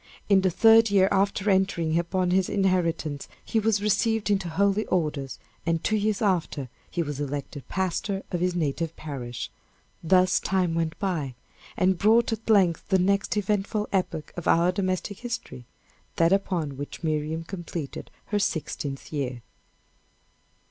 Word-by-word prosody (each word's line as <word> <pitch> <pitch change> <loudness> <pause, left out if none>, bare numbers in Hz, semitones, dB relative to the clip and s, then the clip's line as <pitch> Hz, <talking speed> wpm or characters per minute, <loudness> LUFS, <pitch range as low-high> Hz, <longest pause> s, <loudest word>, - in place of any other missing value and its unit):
In 195 -2 +6
the 190 - +3
third 225 +4 +6
year 195 -1 +4
after 195 +1 +1
entering 190 -5 +2
upon 180 +1 0
his 185 0 +2
inheritance, 170 -7 0 0.2
he 225 - +1
was 215 -2 +1
received 220 0 +1
into 190 -4 0
holy 200 +5 +2
orders; 150 -6 -1 0.3
and 165 -1 0
two 215 - +1
years 215 0 0
after, 170 - 0 0.2
he 170 - -1
was 145 -2 -5
elected 145 0 -5
pastor 195 +1 -2
of 175 - -1
his 180 0 0
native 165 0 -1
parish. 125 -6 -6 0.5
Thus 185 +2 +4
time 185 -3 0
went 165 -1 -1
by, 160 - -2 0.4
and 185 -1 +2
brought 225 +3 +4
at 225 +1 -7
length 185 -6 +3
the 190 - +4
next 200 +3 +1
eventful 210 +1 0
epoch 170 -5 -1
of 175 - -5
our 170 +2 +4
domestic 185 +1 -2
history 235 - -6 0.5
that 165 +2 +4
upon 170 -8 -1
which 145 +4 -7
Miriam 155 +1 -1
completed 170 -4 -6 0.2
her 205 - +1
sixteenth 145 -6 -3
year. 130 -5 -3
180 Hz, 150 wpm, -26 LUFS, 160-200 Hz, 0.5 s, In